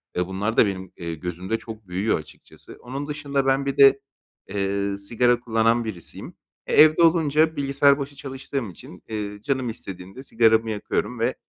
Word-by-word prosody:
ve 90 0 0
bunlar 100 +4 -2
da - - +7
benim, 95 -2 -4
eee, 85 -2 -5
gözümde 90 +6 -4
çok 110 -3 -10
büyüyor 95 +3 0
açıkçası. 75 0 -15
Onun 135 +4 -6
dışında 140 -2 -2
ben 135 +1 +2
bir 140 0 -2
de, 135 0 +7 0.5
eee, 100 0 -2
sigara 120 +4 +1
kullanan 115 0 +1
birisiyim. 95 -7 -7 0.3
E, - - -2
evde 155 +2 +7
olunca 160 -1 +3
bilgisayar 140 0 +3
başı 140 +1 -6
çalıştığım 135 -3 -5
için, 90 +1 -14
eee, 105 -1 -5
canım 130 -1 -1
istediğimde 95 +1 -8
sigaramı 115 -2 +3
yakıyorum 110 +3 -3
ve, 120 +3 0
115 Hz, 160 wpm, -24 LUFS, 100-140 Hz, 0.5 s, da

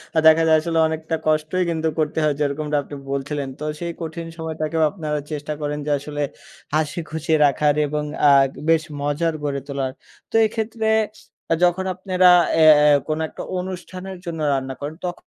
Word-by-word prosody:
আ - - 0
দেখা 160 +1 +6
যায় 160 -1 +6
আসলে 165 0 -2
অনেকটা 160 +1 -3
কষ্টই 155 +4 +1
কিন্তু 160 -1 -1
করতে 155 +1 0
হয় 150 -1 +2
যেরকমটা 150 +1 -1
আপনি 145 - -9 0.2
বলছিলেন। 140 +1 -3
তো - - -6 0.2
সেই 170 -1 -3
কঠিন 165 +1 -5
সময়টাকেও 160 0 -2
আপনারা 155 -5 -3
চেষ্টা 150 0 -4
করেন 150 0 -2
যে 150 - -1
আসলে 145 +1 -5 0.5
হাসি 155 +1 0
খুশি 160 +1 -4
রাখার 145 +1 +3
এবং 150 +1 -2 0.2
আ - - +8 0.2
দে - - -12
বেশ 165 -1 +4 0.2
মজার 145 +3 0
গড়ে 140 -1 -1
তোলার। 135 -2 -2 0.4
তো - - -7
এক্ষেত্রে 220 0 -2 0.6
আ - - +6
যখন 180 +2 +2
আপনারা 185 0 +2 0.3
এ্যা 160 -1 +8
এ্যা 150 -1 +6
কোনো 155 0 -1
একটা - - -8 0.2
অনুষ্ঠানের 185 +1 -7
জন্য 165 -2 -5
রান্না 135 -1 -2
করেন 145 +2 -5
তখ 175 -1 -2
155 Hz, 175 wpm, -22 LUFS, 150-170 Hz, 0.6 s, আ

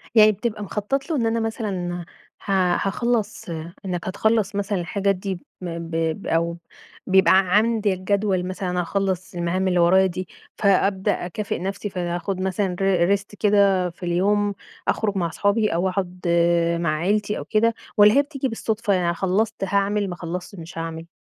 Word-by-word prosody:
يعني 215 -1 +8
بتبقى 210 +1 -3
مخطّط 210 - -2
له 325 - 0
إن 240 -5 +1
أنا 225 0 +1
مثلًا 190 -6 -3 0.4
ها 185 -3 +2
هاخلّص 235 +1 -1 0.4
إنك 180 -2 -3
هتخلّص 210 +1 +1
مثلًا 200 -1 -1
الحاجات 195 +3 0
دي 190 -1 -4 0.2
م 170 -2 -4
ب 165 0 -7 0.3
ب - - -8
أو 170 +1 0 0.5
بيبقى 190 0 +5 0.3
عندك 215 -3 +2
جدول 195 -1 0
مثلًا 180 -1 -2
أخلّص 185 0 -2
المهام 175 +2 0
اللي 180 -1 +2
ورايا 190 +3 +5
دي، 185 0 -3 0.3
فأبدأ 195 -1 +2
أكافئ 200 +4 -3
نفسي 195 +3 -4
فهاخُد 180 +1 -3
مثلًا 190 0 -1
ر - - +1 0.3
ر - - +6
Rest 200 +1 -14
كده 200 -3 +3
في 175 +1 -15
اليوم، 200 +4 +1 0.3
أخرُج 205 -3 0
مع 170 -2 0
صحابي 210 +5 +1
أو 180 +3 +1
أقعد 185 -1 -4 0.6
مع 155 -2 +1
عيلتي 205 +6 0
أو - - -6
كده، 230 +1 +2 0.2
والّا 210 +1 +7
هي 280 - +6
بتيجي 280 -2 -3
بالصُدفة، 220 -2 -1
يعني 175 -2 +1
خلّصت 195 +5 0
هاعمل، 200 +1 +1
ما 175 - -4
خلّصتش 180 +3 -6
مش 165 +1 -10
هاعمل؟ 165 0 -5
195 Hz, 165 wpm, -23 LUFS, 180-210 Hz, 0.6 s, يعني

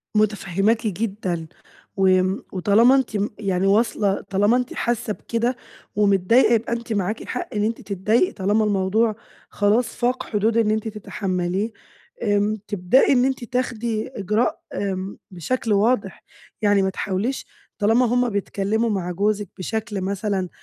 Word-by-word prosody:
متفهّماكِ 210 +1 +1
جدًا، 190 -4 -3 0.5
و 190 0 +3
آمم 185 +1 +2
وطالما 210 +7 +5
أنتِ 255 -6 0
م 205 +1 0
يعني 195 -2 0
واصلة، 205 -1 +2
طالما 205 +5 +3
أنتِ 250 0 -3
حاسّة 235 -2 -1
بكده 235 +4 -2 0.4
ومتضايقة 205 +4 +4
يبقى 230 +1 +1
أنتِ 235 -1 -3
معاكِ 205 +2 -2
حَق 250 - -3
إن 210 - +1
أنتِ 225 +2 -1
تتضايقي 210 - +1
طالما 205 +3 +1
الموضوع 210 +2 +1 0.3
خلاص 210 +4 +2
فاق 250 +1 0
حدود 220 +1 +1
إن 220 -2 +3
أنتِ 220 +1 -1
تتحملّيه. 195 -1 -2 0.5
آمم 205 0 +2
تبدئي 205 +8 +3
إن 250 -1 +4
أنتِ 265 -2 -1
تاخدي 235 -3 -2
إجراء، 215 -1 -1
آمم 195 -1 -3
بشكل 215 +5 -1
واضح، 205 -1 +1 0.4
يعني 205 -2 +4
ما 190 - +1
تحاوليش 200 +7 -2 0.3
طالما 225 +4 +4
هُم 245 +1 +2
بيتكلّموا 205 +2 -1
مع 185 -4 -2
جوزِك 205 +2 0
بشكل 210 +1 -3
مثلًا، 195 -1 -2
210 Hz, 140 wpm, -22 LUFS, 195-230 Hz, 0.5 s, وطالما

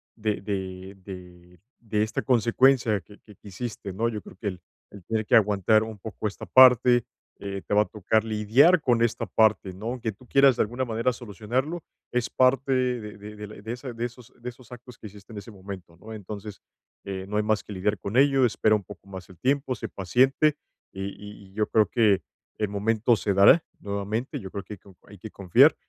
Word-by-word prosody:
de 105 -4 -2
de 95 -1 -5
de 90 -2 -12 0.2
de 105 -2 -1
esta 110 - -2
consecuencia 120 -2 +3
que 105 +2 -17
que 105 -3 -17
que - - -17
hiciste, 100 0 -6
¿no? 115 +4 0
Yo 105 -3 -5
creo - - -14
que 105 - -5
el 90 -2 -4 0.3
el 100 -3 -12
tener 110 -1 -1
que - - +3
aguantar 105 +1 +4
un 110 -2 -8
poco 110 +1 -5
esta 100 - -7
parte, 125 -2 +6 0.4
eh, 100 -1 -5
te - - -2
va 105 +1 +5
a - - -12
tocar 110 +1 0
lidiar 115 - +4
con 120 -2 +2
esta 115 0 0
parte, 100 -2 +2
¿no?, 100 +4 -10
aunque 120 -2 -3
tú 120 +6 -19
quieras, 135 -1 +5
de - - +2
alguna 120 +5 -3
manera, 115 +2 0
solucionarlo, 125 - -3 0.3
es 125 -1 -1
parte 130 +1 +2
de 125 -5 -1
de 105 +1 -10
de 105 0 -8
la 105 - -11
i - - -12
de 110 +2 -6
esa 125 0 -7
de 115 +1 -3
esos 120 -1 -10
de 125 - -4
esos 125 -1 -15
actos 125 0 -12
que 110 - -9
hiciste 100 +2 -15
en - - -8
ese 115 +3 -11
momento, 95 -4 -10
¿no? 110 +4 -10
Entonces, 105 0 -8 0.5
eh, 95 -1 -5
no 105 - -1
hay 105 - +2
más 110 0 0
que - - -12
lidiar 100 +2 -1
con 105 +5 -3
ello, 135 -1 +5
espera 110 -1 +2
un 105 - -3
poco 100 -1 -13
más 95 -2 -9
el 90 - -15
tiempo, 135 0 0
sé - - -6
paciente, 130 - +2 0.3
y 95 - -6
y 105 -1 -12
y - - -22
yo 105 +1 0
creo 110 -1 +4
que 110 -6 +2 0.3
el 105 - 0
momento 110 +3 +1
se 105 -2 -1
dará 100 - +6 0.2
nuevamente. 100 +4 -3
Yo 95 -2 -8
creo 100 - -5
que 105 - -8
hay - - -9
que - - -40
co 90 - -24
hay 100 - -13
que 110 - -9
confiar, 95 -4 +4
105 Hz, 225 wpm, -26 LUFS, 100-120 Hz, 0.5 s, parte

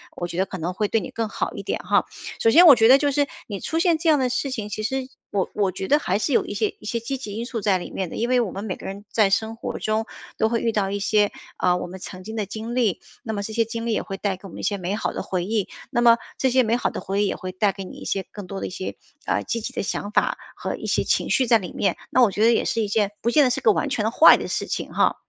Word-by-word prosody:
我 175 - -3
觉 170 - -7
得 190 - +2
可 190 - -6
能 175 +1 -3
会 210 +3 0
对 225 - +1
你 175 - -6
更 225 -1 -2
好 - - -3
一 - - -6
点 - - -3
哈。 - - +2 0.3
首 225 - +4
先 340 +10 +8
我 295 -6 +10
觉 225 -1 +5
得 260 +3 +8
就 290 0 +1
是， 285 +1 +1 0.2
你 200 -3 -5
出 320 - -3
现 335 -1 +3
这 330 - +1
样 305 - +5
的 255 -1 +1
事 255 +3 -1
情， 220 -5 -3
其 215 +1 -4
实 265 +3 -2 0.2
我 195 -2 0
我 200 -3 +1
觉 190 +1 -5
得 295 - +4
还 190 -9 0
是 275 - 0
有 - - +3
一 - - -5
些 210 +1 -1
一 - - -12
些 235 +2 -1
积 250 +4 -4
极 235 -6 -7
因 230 +3 -4
素 240 -3 -4
在 200 -2 +3
里 175 - -7
面 185 -3 -3
的， - - -8
因 235 - 0
为 255 0 +4
我 215 -6 -2
们 195 - -6
每 190 - -3
个 - - -12
人 200 +2 -7
在 215 -3 +3
生 220 +3 0
活 230 - -5
中， 215 +1 0 0.3
都 220 - +2
会 230 0 +1
遇 230 - +1
到 195 -2 0
一 200 - -2
些， 205 +1 +2 0.3
啊， 180 -1 +2
我 - - -4
们 185 +2 -8
曾 185 0 -8
经 220 +3 -7
的 210 - -1
经 225 +4 -6
历， 230 -7 +1 0.2
那 220 - -4
么 205 -1 -3
这 220 - -5
些 230 0 +2
经 230 +1 -5
历 235 - 0
也 - - 0
会 195 - -6
带 195 -1 -1
给 195 - -11
我 - - -11
们 - - -10
一 - - -7
些 205 0 0
美 185 +2 -2
好 215 - -2
的 - - -3
回 180 -2 -2
忆， 210 -1 0 0.2
那 240 - +1
么 235 -1 +7 0.2
这 265 - +2
些 255 +1 +4
美 230 0 +1
好 - - 0
的 - - -6
回 200 +2 0
忆 - - +2
也 - - -1
会 185 - -6
带 195 +2 +1
给 195 0 -7
你 185 - -10
一 - - -9
些 195 - -1
更 205 -3 -8
多 195 +1 -5
的 - - -2
一 - - -6
些， 185 +1 -5 0.3
呃， - - 0
积 230 - -2
极 - - -5
的 - - -2
想 205 +1 -3
法 - - +1 0.2
和 - - -4
一 - - -8
些 - - +1
情 - - 0
绪 265 - +3
在 230 - +6
里 185 -5 -7
面， - - 0
那 255 - +4
我 215 - +4
觉 210 - 0
得 230 - +6
也 - - +2
是 230 - 0
一 210 - 0
件， 205 0 +1
不 235 - +1
见 295 - +5
得 260 - +3
是 250 - 0
个 445 - +5
完 305 -7 0
全 245 -5 -1
的 220 - +1
坏 315 - +8
的 - - -5
事 - - -2
情 - - -4
哈。 - - +3
215 Hz, 355 characters per minute, -23 LUFS, 195-235 Hz, 0.3 s, 我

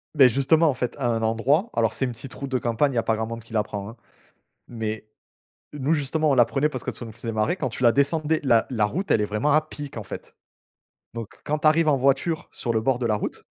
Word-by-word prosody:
Beh, 135 -3 +8
justement, 140 +6 +3
en - - +1
fait, 125 -1 -3
à 130 -4 -1
un 115 -1 0
endroit 130 - +1
alors 115 -2 +1
c'est 135 - -1
une 125 - -3
petite 120 +3 -10
route 140 -1 -6
de 130 - +2
campagne, 120 +4 +1
il - - -6
y - - 0
a 115 - +2
pas 115 -1 +1
grand 110 0 -3
monde 115 0 -6
qui 115 - -15
la 110 - +3
prend, 100 0 -6
hein. 115 - -11 0.7
Mais 110 -2 -4 0.7
nous, 145 +2 -1
justement, 155 +1 +1
on - - +4
la 120 -2 +6
prenait 135 +6 0
parce 130 -4 -6
que - - -2
ça - - -7
nous 115 - -9
faisait 115 +1 -6
marrer 110 - 0
quand 135 -8 -2
tu 130 - -6
la 120 - +7
descendais, 155 +2 +1
la 115 -4 +4
la 110 -4 +1
route. 185 - -3
Elle 105 - +4
est - - +2
vraiment 105 +8 0
à 155 - +5
pic, 145 -4 -9
en 110 - -4
fait. - - -9 0.8
Donc, 115 -3 -5 0.2
quand 150 +1 -1
tu - - 0
arrives 155 +1 +4
en 145 - +4
voiture 140 +5 +1
sur 120 - -3
le 110 - +1
bord 125 +2 +1
de 120 - -1
la 110 - +2
route, - - -5
125 Hz, 275 wpm, -24 LUFS, 115-145 Hz, 0.8 s, Beh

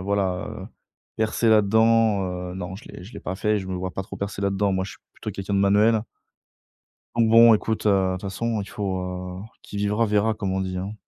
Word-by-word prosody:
voilà, 95 -2 -1
heu, - - -7 0.5
percer 110 +1 +1
là-dedans, 110 -1 +4 0.3
heu, - - -8
non 90 0 -6
je 115 - -13
l'ai - - -10
je 105 - -12
l'ai - - -7
pas 95 - -4
fait 105 +1 +1
et - - +1
je 95 - -6
me 95 - -3
vois 90 0 -3
pas 95 - -4
trop 95 - -9
percer 100 0 -4
là-dedans. 100 0 +1
Moi, 95 0 0
je - - -7
suis - - -15 0.2
plutôt - - -6
quelqu'un 100 +1 -4
de 100 - +3
manuel. 105 +2 +4 1.1
Donc, 115 -1 +4
bon, 115 0 +8
écoute, 110 0 -1
heu, - - +6
de 95 -2 +2
toute 95 - -7
façon, 110 +3 -2
il 100 - -6
faut 90 -2 -4 0.2
qui - - -9
vivra 105 +3 +1
verra, 105 +1 +2
comme 100 -3 -3
on 95 - 0
dit, 95 -1 -3
hein? 100 +3 -5
100 Hz, 235 wpm, -24 LUFS, 95-110 Hz, 1.1 s, bon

